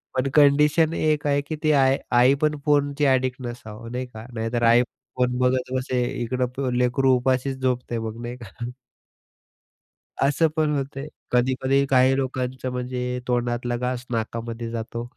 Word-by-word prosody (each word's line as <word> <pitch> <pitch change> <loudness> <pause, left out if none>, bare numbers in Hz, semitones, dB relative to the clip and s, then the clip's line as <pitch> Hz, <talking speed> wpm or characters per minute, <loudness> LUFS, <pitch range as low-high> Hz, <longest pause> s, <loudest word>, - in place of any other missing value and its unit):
पण 130 +1 +1
कंडिशन 150 +2 +4
एक 155 -2 0
आहे 145 0 +2
की 145 +2 -5
ती 155 - +4
आय 135 +1 +3 0.2
आई 125 +2 +6
पण 150 0 +2
फोनची 145 0 +2
ॲडिक्ट 130 -1 +1
नसावं, 115 -2 -8
नाही 125 +1 -3
का, 110 -2 -10
नाहीतर 115 +1 -2
आई 115 +1 +6 0.4
फोन 125 0 +1
बघत 125 0 +1
बसे. 130 -1 0 0.2
इकडं 125 +2 -1
प 135 -2 -1
लेकरू 125 +1 +3
उपाशीच 130 +1 0
झोपतय 125 -2 -1
मग, 110 +1 -5
नाही 120 +1 -6
का? 120 +2 -8 1.5
असं 145 +4 +3
पण 155 -2 +1
होतंय. 135 +1 -5 0.2
कधी-कधी 130 +2 +2
काही 130 0 +4
लोकांचं 130 -1 -3
म्हणजे 125 0 -3
तोंडातला 120 0 -1
घास 125 0 -3
नाकामध्ये 115 0 -3
जातो. 115 0 -4
125 Hz, 150 wpm, -24 LUFS, 120-135 Hz, 1.5 s, आई